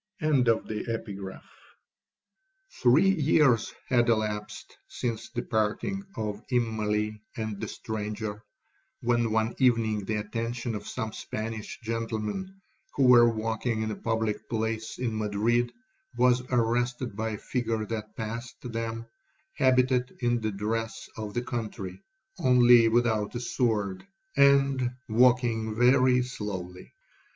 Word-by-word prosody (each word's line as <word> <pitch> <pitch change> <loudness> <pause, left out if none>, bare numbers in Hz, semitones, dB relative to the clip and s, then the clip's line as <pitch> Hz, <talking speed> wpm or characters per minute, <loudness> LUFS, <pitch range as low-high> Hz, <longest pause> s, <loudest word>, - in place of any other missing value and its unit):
'Three 475 - +4
years 150 - +3 0.2
had 120 -2 +3
elapsed 105 -2 -2
since 115 -3 -4
the - - -4
parting 110 - -1
of 105 -1 -3
Immalee 110 -3 0 0.2
and 110 -3 -4
the - - -3
stranger, 105 -1 -5 0.6
when 120 -1 +2
one 110 +1 +1
evening 115 -5 +2
the 110 - -1
attention 115 +3 -3
of 105 -1 -6
some 110 -1 -4
Spanish 110 -1 -5
gentlemen, 115 - -3 0.4
who 140 - +2
were 120 -2 +7
walking 110 0 -1
in 110 - -2
a - - -3
public 110 -2 -2
place 110 0 -2
in 120 -3 -2
Madrid, 115 +3 +1 0.5
was 125 0 +4
arrested 120 -1 0
by 110 +1 -2
a - - -4
figure 115 -2 -2
that 110 -1 -5
passed 115 +1 -5
them, 115 -1 -4 0.5
habited 130 -1 +2
in 120 -1 +1
the 110 - 0
dress 110 +3 -3
of 105 -2 -6
the 120 - 0
country, 105 -6 -5 0.4
(only 125 -5 +6
without 115 -2 +1
a - - -1
sword), 110 -6 -1 0.3
and 135 -3 +4
walking 115 -2 +3
very 125 +1 +4
slowly. 95 -7 -6
115 Hz, 115 wpm, -28 LUFS, 110-125 Hz, 0.6 s, were